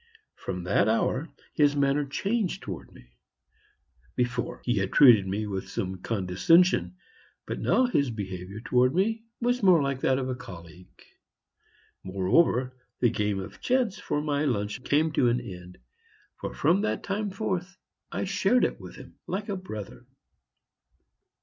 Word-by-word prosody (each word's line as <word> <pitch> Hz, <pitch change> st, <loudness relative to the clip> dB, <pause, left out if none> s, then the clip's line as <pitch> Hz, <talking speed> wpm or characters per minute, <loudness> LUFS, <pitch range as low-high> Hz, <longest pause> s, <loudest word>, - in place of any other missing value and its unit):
From 90 Hz, -1 st, -5 dB
that 95 Hz, +3 st, +2 dB
hour 130 Hz, +7 st, 0 dB, 0.2 s
his 145 Hz, -2 st, +3 dB
manner 140 Hz, +1 st, +2 dB
changed 195 Hz, +5 st, -1 dB
towards 95 Hz, -7 st, -7 dB
me. -, -, -16 dB, 1.1 s
Before, 125 Hz, -1 st, -2 dB
he 120 Hz, -3 st, +1 dB
had 95 Hz, 0 st, -1 dB
treated 115 Hz, -9 st, +7 dB
me 100 Hz, +3 st, -2 dB
with 95 Hz, -2 st, -4 dB
some 95 Hz, 0 st, -3 dB
condescension, 95 Hz, -, +2 dB, 0.5 s
but -, -, -4 dB
now 255 Hz, -, +3 dB
his 145 Hz, -, +1 dB
behavior 100 Hz, -2 st, -6 dB
towards 125 Hz, +1 st, +3 dB
me 220 Hz, +5 st, +1 dB, 0.2 s
was 245 Hz, +1 st, +1 dB
more 185 Hz, -4 st, +6 dB
like 140 Hz, -2 st, -1 dB
that 130 Hz, -, +2 dB
of 130 Hz, -1 st, -2 dB
a 130 Hz, -, -2 dB
colleague. 90 Hz, -7 st, -12 dB, 1.0 s
Moreover, 120 Hz, -, +2 dB, 0.3 s
the 120 Hz, -, +3 dB
game 105 Hz, -3 st, -1 dB
of 100 Hz, +2 st, -9 dB
chance 245 Hz, -6 st, +1 dB
for 145 Hz, -, -2 dB
my 145 Hz, -1 st, 0 dB
lunch 105 Hz, -4 st, -2 dB
came 155 Hz, +4 st, +2 dB
to 125 Hz, -4 st, +3 dB
an 120 Hz, +1 st, +1 dB
end, 90 Hz, -6 st, -10 dB, 0.6 s
for -, -, -4 dB
from 170 Hz, +7 st, +2 dB
that 215 Hz, -, -2 dB
time 205 Hz, +1 st, -2 dB
forth 190 Hz, -1 st, -3 dB, 0.3 s
I -, -, -2 dB
shared 200 Hz, +5 st, +2 dB
it -, -, -3 dB
with -, -, -10 dB
him -, -, -14 dB
like 205 Hz, +3 st, -3 dB
a 200 Hz, -, -1 dB
brother. 110 Hz, -, -8 dB
130 Hz, 150 wpm, -27 LUFS, -, 1.1 s, treated